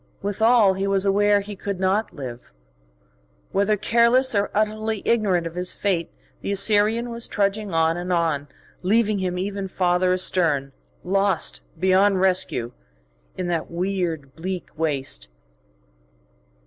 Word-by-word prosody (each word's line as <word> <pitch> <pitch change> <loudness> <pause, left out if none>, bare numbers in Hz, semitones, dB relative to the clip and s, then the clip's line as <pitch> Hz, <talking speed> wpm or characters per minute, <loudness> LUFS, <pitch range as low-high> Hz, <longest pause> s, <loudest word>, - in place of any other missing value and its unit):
Withal 215 0 +4
he 195 +1 -2
was 195 0 +2
aware 205 +1 +3
he 205 +1 -8
could 200 -1 -5
not 190 +3 0
live. 130 -7 -9 1.0
Whether 200 +2 +1
careless 235 +5 +3
or 200 -1 +1
utterly 215 0 -1
ignorant 200 -7 +1
of 165 - -5
his 180 +1 -2
fate, 175 -5 -1 0.3
the - - -3
Assyrian 215 +4 +3
was 235 0 -1
trudging 205 0 -1
on 165 0 +2
and 180 +1 -4
on, 160 -4 0 0.3
leaving 210 +2 +2
him 180 -1 -2
ever 195 +1 -3
farther 180 0 +1
astern, 165 -7 +1 0.3
lost 195 -1 0 0.2
beyond 190 +2 +3
rescue 185 -10 +1 0.7
in 185 - -3
that 170 -2 -2
weird, 170 -6 -3
bleak 180 +2 -5
waste. 135 - -2
190 Hz, 130 wpm, -23 LUFS, 175-205 Hz, 1.0 s, Withal